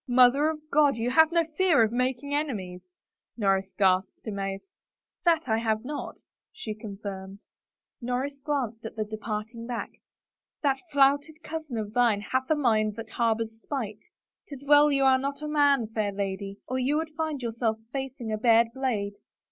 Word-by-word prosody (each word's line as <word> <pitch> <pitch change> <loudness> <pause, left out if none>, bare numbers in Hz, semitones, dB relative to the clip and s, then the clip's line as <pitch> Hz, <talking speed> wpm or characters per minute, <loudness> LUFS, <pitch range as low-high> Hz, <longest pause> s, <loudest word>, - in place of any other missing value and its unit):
" - - -65
Mother 275 +5 +6
of 310 -1 -4
God, 290 -1 +5
but - - -8
you 240 +2 0
have 320 +3 +5
no 335 0 +3
fear 325 -4 +3
of 220 - +1
making 255 +3 -1
enemies 205 -12 -2
I 185 - -45 0.2
" - - -60
Norris 195 -3 +1
gasped, 190 -1 +2
amazed. 195 - -4 0.3
" - - -54
That 330 -3 +3
I 220 -1 +2
have 220 0 -1
not," 290 +2 -5 0.4
she 215 - -6
confirmed. 200 -2 -8 0.6
Norris 255 +4 -2
glanced 255 -7 -2
at 220 - -7
the 215 -1 -2
departing 220 +2 -5
back. 240 -2 -4 0.4
" - - -59
That 275 -2 +2
flouted 285 +3 +3
cousin 310 -6 -5
of 210 -1 -4
thine 235 -4 +3
hath 260 +4 -2
a 315 - +4
mind 215 -7 +2
that 225 0 -8
harbors 225 -1 -1
spite. 225 -8 -4 0.5
'Tis 280 -1 -10
well 295 +1 +6
you 275 -1 +2
are 265 -1 +5
not 280 +2 -4
a - - -3
man, 285 -4 +3
fair 215 -2 -2
lady, 195 0 -4
or 255 +1 -2
you 275 +4 +1
would 320 0 -2
find 310 -4 -2
yourself 230 -1 -1 0.2
facing 265 -4 -4
a 215 - -1
bared 230 0 +5
blade." 235 -7 -1
245 Hz, 185 wpm, -27 LUFS, 215-285 Hz, 0.6 s, Mother